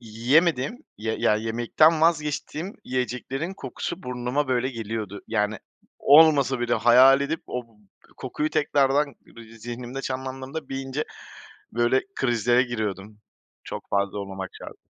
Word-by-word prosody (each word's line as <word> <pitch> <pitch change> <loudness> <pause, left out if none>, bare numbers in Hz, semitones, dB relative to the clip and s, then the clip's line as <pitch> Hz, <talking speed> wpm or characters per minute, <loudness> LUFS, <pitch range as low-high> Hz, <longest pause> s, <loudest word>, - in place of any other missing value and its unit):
yiyemediğim, 135 - +1
ya 110 +1 -2 0.2
ye 110 - -5
yemekten 135 +8 +3
vazgeçtiğim 160 +3 0
yiyeceklerin 130 +7 -3
kokusu 190 -1 -6
burnuma, 125 +3 -2
böyle, 130 0 +1
geliyordu. 110 -3 -5
Yani, 105 +1 0 0.4
olmasa 140 -4 +6
bile 120 0 +1
hayal 125 +4 +6
edip 155 +3 -2
o 125 - -4
b 110 - -26 0.4
kokuyu 155 +1 -3
tekrardan 140 0 +2
bı 115 - -15 0.2
zihnimde 120 +3 -6
canlandırıp 130 +3 -5
iyice, 135 +2 -3 0.7
böyle, 120 +3 +2
krizlere 120 0 +2
giriyordum. 105 -4 -4 0.5
Çok - - -8
fazla 100 0 0
olmamak 95 -1 -6
şart. - - -10
125 Hz, 120 wpm, -25 LUFS, 115-145 Hz, 0.7 s, olmasa